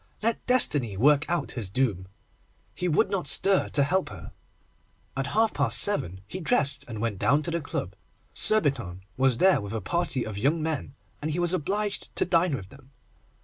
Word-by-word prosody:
Let 230 Hz, 0 st, 0 dB
Destiny 145 Hz, -, +2 dB
work 145 Hz, +5 st, +3 dB
out 170 Hz, -4 st, -1 dB
his 110 Hz, -7 st, -1 dB
doom. 100 Hz, -5 st, -1 dB, 0.7 s
He 180 Hz, -, -3 dB
would 160 Hz, -, +2 dB
not 190 Hz, -3 st, -1 dB
stir 195 Hz, -1 st, +3 dB
to 145 Hz, -, +2 dB
help 185 Hz, +6 st, 0 dB
her. 100 Hz, -4 st, -10 dB, 0.8 s
At 135 Hz, 0 st, -2 dB
half 225 Hz, 0 st, +3 dB
past -, -, +3 dB
seven 95 Hz, -, 0 dB
he 185 Hz, -, -6 dB
dressed, 140 Hz, -3 st, +2 dB
and 110 Hz, -3 st, -7 dB
went 110 Hz, -4 st, -2 dB
down 145 Hz, +3 st, +2 dB
to 170 Hz, -, -2 dB
the 170 Hz, 0 st, -2 dB
club. 95 Hz, -9 st, -4 dB, 0.4 s
Surbiton 135 Hz, -, +1 dB
was 130 Hz, -2 st, +2 dB
there 190 Hz, -, +4 dB
with 100 Hz, +1 st, -7 dB
a 110 Hz, -, -2 dB
party 170 Hz, -, -1 dB
of 105 Hz, -2 st, -6 dB
young 145 Hz, +8 st, +1 dB
men, 155 Hz, -4 st, -3 dB, 0.3 s
and 155 Hz, -, -3 dB
he 155 Hz, -, -2 dB
was 175 Hz, 0 st, +1 dB
obliged 200 Hz, +5 st, -2 dB
to -, -, +2 dB
dine 170 Hz, -3 st, +2 dB
with 95 Hz, -6 st, -8 dB
them. 135 Hz, +1 st, -17 dB
145 Hz, 190 wpm, -26 LUFS, 115-175 Hz, 0.8 s, there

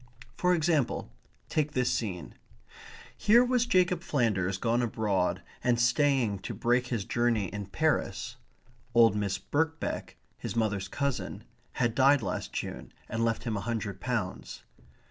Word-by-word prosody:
For 180 Hz, 0 st, +3 dB
example, 155 Hz, -, 0 dB, 0.4 s
take 150 Hz, -1 st, 0 dB
this 125 Hz, -1 st, +1 dB
scene. 95 Hz, -7 st, -3 dB, 0.8 s
Here 235 Hz, +4 st, +5 dB
was 245 Hz, -1 st, +2 dB
Jacob 180 Hz, -4 st, +3 dB
Flanders 105 Hz, -, 0 dB
gone 115 Hz, +4 st, +1 dB
abroad 100 Hz, -6 st, 0 dB, 0.2 s
and 120 Hz, -1 st, +2 dB
staying 120 Hz, -4 st, +2 dB
to -, -, -6 dB
break 120 Hz, +1 st, +1 dB
his 115 Hz, -5 st, -2 dB
journey 115 Hz, -5 st, +1 dB
in 100 Hz, -1 st, -5 dB
Paris. 95 Hz, -2 st, -1 dB, 0.6 s
(Old 115 Hz, -3 st, +6 dB
Miss 100 Hz, -2 st, -1 dB
Birkbeck, 160 Hz, +2 st, -2 dB, 0.2 s
his -, -, -5 dB
mother's 105 Hz, -4 st, 0 dB
cousin, 140 Hz, -2 st, -3 dB, 0.3 s
had 120 Hz, -2 st, +1 dB
died 135 Hz, +1 st, +4 dB
last 90 Hz, -, -3 dB
June -, -, -5 dB, 0.2 s
and 115 Hz, +1 st, -1 dB
left 115 Hz, -1 st, 0 dB
him 115 Hz, -3 st, -2 dB
a 100 Hz, -, -2 dB
hundred 110 Hz, -4 st, -3 dB
pounds.) 110 Hz, -7 st, -3 dB
120 Hz, 140 wpm, -29 LUFS, 105-140 Hz, 0.8 s, Old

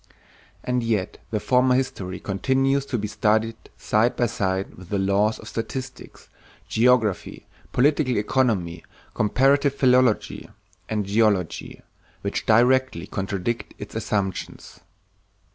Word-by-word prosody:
And 125 Hz, 0 st, 0 dB
yet 110 Hz, -5 st, -2 dB
the 110 Hz, -, -1 dB
former 125 Hz, +2 st, +3 dB
history 95 Hz, -8 st, -3 dB
continues 135 Hz, +7 st, 0 dB
to 125 Hz, -, -1 dB
be 105 Hz, -1 st, -3 dB
studied 110 Hz, +2 st, +1 dB, 0.2 s
side 110 Hz, +3 st, +1 dB
by 120 Hz, -, +1 dB
side 95 Hz, -3 st, -2 dB
with 95 Hz, -1 st, -14 dB
the 100 Hz, -, 0 dB
laws 100 Hz, +3 st, +1 dB
of 110 Hz, -, -12 dB
statistics, 130 Hz, +4 st, -6 dB, 0.4 s
geography, 115 Hz, -2 st, +1 dB, 0.3 s
political 140 Hz, -1 st, +2 dB
economy, 105 Hz, -7 st, 0 dB, 0.3 s
comparative 135 Hz, +6 st, +2 dB
philology, 125 Hz, -4 st, +2 dB, 0.4 s
and 105 Hz, -2 st, -1 dB
geology, 100 Hz, -4 st, 0 dB, 0.4 s
which -, -, -3 dB
directly 130 Hz, +4 st, +3 dB
contradict 100 Hz, +3 st, -3 dB
its 105 Hz, -, -9 dB
assumptions. 100 Hz, -4 st, -3 dB
110 Hz, 110 wpm, -24 LUFS, 100-125 Hz, 0.4 s, former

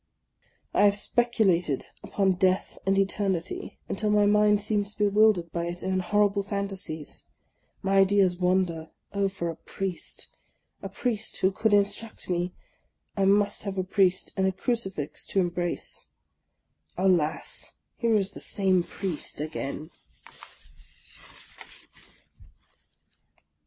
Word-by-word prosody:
I -, -, +3 dB
have 200 Hz, 0 st, +5 dB
speculated 205 Hz, -, +1 dB, 0.2 s
upon 195 Hz, -2 st, +1 dB
Death 185 Hz, +1 st, +1 dB
and 195 Hz, 0 st, +3 dB
Eternity 195 Hz, -3 st, -1 dB
until 210 Hz, +2 st, -1 dB
my 210 Hz, 0 st, +4 dB
mind 210 Hz, 0 st, +4 dB
seems 205 Hz, 0 st, -1 dB
bewildered 205 Hz, -4 st, +3 dB
by 170 Hz, 0 st, -2 dB
its 175 Hz, +1 st, -5 dB
own 190 Hz, 0 st, 0 dB
horrible 205 Hz, +2 st, +2 dB
fantasies. 195 Hz, -6 st, -4 dB, 0.6 s
My 195 Hz, 0 st, +2 dB
ideas 195 Hz, -2 st, +4 dB
wander. 180 Hz, -3 st, 0 dB, 0.2 s
Oh, 200 Hz, 0 st, +1 dB
for 190 Hz, -3 st, -4 dB
a -, -, -9 dB
Priest, 190 Hz, +2 st, -6 dB, 0.2 s
— -, -, -48 dB
a -, -, -5 dB
Priest 220 Hz, -4 st, -1 dB
who 190 Hz, -, +4 dB
could 220 Hz, +3 st, 0 dB
instruct 205 Hz, 0 st, 0 dB
me! 175 Hz, +1 st, 0 dB, 0.6 s
I 195 Hz, -, +2 dB
must 200 Hz, +1 st, +3 dB
have 200 Hz, -2 st, -4 dB
a 185 Hz, -, +1 dB
Priest, 185 Hz, -1 st, +1 dB
and 190 Hz, -2 st, +2 dB
a -, -, +2 dB
crucifix 190 Hz, -, -2 dB
to 195 Hz, -, +1 dB
embrace. 175 Hz, -1 st, -2 dB, 0.9 s
Alas! 180 Hz, -5 st, 0 dB, 0.2 s
here 230 Hz, -2 st, +2 dB
is 200 Hz, -2 st, +1 dB
the -, -, -10 dB
same 190 Hz, -2 st, +2 dB
Priest 175 Hz, -4 st, -3 dB
again! 155 Hz, +1 st, -5 dB
195 Hz, 120 wpm, -27 LUFS, 180-205 Hz, 0.9 s, have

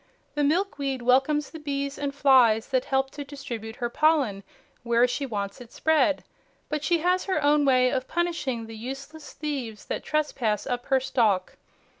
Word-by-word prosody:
The 295 Hz, 0 st, 0 dB
milkweed 285 Hz, -5 st, 0 dB
welcomes 270 Hz, +4 st, +2 dB
the 320 Hz, -, -8 dB
bees 280 Hz, -1 st, -3 dB
and 285 Hz, -1 st, -1 dB
flies 255 Hz, -6 st, +4 dB
that 260 Hz, -2 st, +1 dB
help 270 Hz, 0 st, 0 dB
to 290 Hz, -, -6 dB
distribute 255 Hz, -6 st, -7 dB
her 240 Hz, -2 st, -2 dB
pollen 285 Hz, -11 st, +2 dB, 0.4 s
where 235 Hz, +1 st, +3 dB
she 275 Hz, +3 st, -3 dB
wants 200 Hz, 0 st, -4 dB
it 235 Hz, -, -12 dB
spread, 305 Hz, -2 st, +2 dB, 0.5 s
but 300 Hz, -1 st, -2 dB
she 345 Hz, +2 st, +3 dB
has 360 Hz, +2 st, +1 dB
her 380 Hz, -, 0 dB
own 290 Hz, 0 st, +4 dB
way 255 Hz, -2 st, +4 dB
of 260 Hz, -1 st, -2 dB
punishing 330 Hz, -9 st, -2 dB
the 225 Hz, 0 st, -9 dB
useless 275 Hz, +6 st, -8 dB
thieves 265 Hz, -9 st, -5 dB
that -, -, -4 dB
trespass 255 Hz, -9 st, -1 dB
up 245 Hz, -1 st, -3 dB
her 265 Hz, -1 st, +3 dB
stalk. 220 Hz, -8 st, +1 dB
270 Hz, 170 wpm, -26 LUFS, 240-295 Hz, 0.5 s, flies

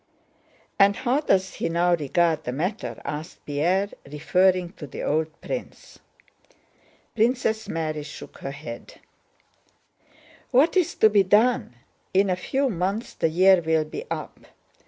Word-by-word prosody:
"And 200 Hz, 0 st, +6 dB
how 255 Hz, +4 st, +1 dB
does 190 Hz, -10 st, +1 dB
he -, -, -2 dB
now 175 Hz, +1 st, +2 dB
regard 160 Hz, +1 st, +1 dB
the 125 Hz, -, -3 dB
matter?" 180 Hz, -, -3 dB
asked 155 Hz, +4 st, -6 dB
Pierre, 175 Hz, +8 st, 0 dB, 0.2 s
referring 180 Hz, +4 st, +2 dB
to 150 Hz, -, -8 dB
the -, -, -7 dB
old 155 Hz, +1 st, +1 dB
prince. -, -, -7 dB, 1.2 s
Princess 225 Hz, -1 st, +1 dB
Mary 155 Hz, -2 st, -2 dB
shook 145 Hz, 0 st, -10 dB
her -, -, -5 dB
head. 135 Hz, -4 st, -9 dB, 1.5 s
"What 275 Hz, +8 st, +3 dB
is 365 Hz, -3 st, +2 dB
to 220 Hz, -, +5 dB
be 205 Hz, -1 st, +5 dB
done? 210 Hz, -, +2 dB, 0.4 s
In 195 Hz, 0 st, +4 dB
a -, -, +2 dB
few 270 Hz, +9 st, -1 dB
months 195 Hz, +1 st, -2 dB
the 165 Hz, -, 0 dB
year 185 Hz, +2 st, +5 dB
will 160 Hz, -1 st, +1 dB
be 155 Hz, -, -6 dB
up. -, -, -5 dB
180 Hz, 135 wpm, -24 LUFS, 155-210 Hz, 1.5 s, And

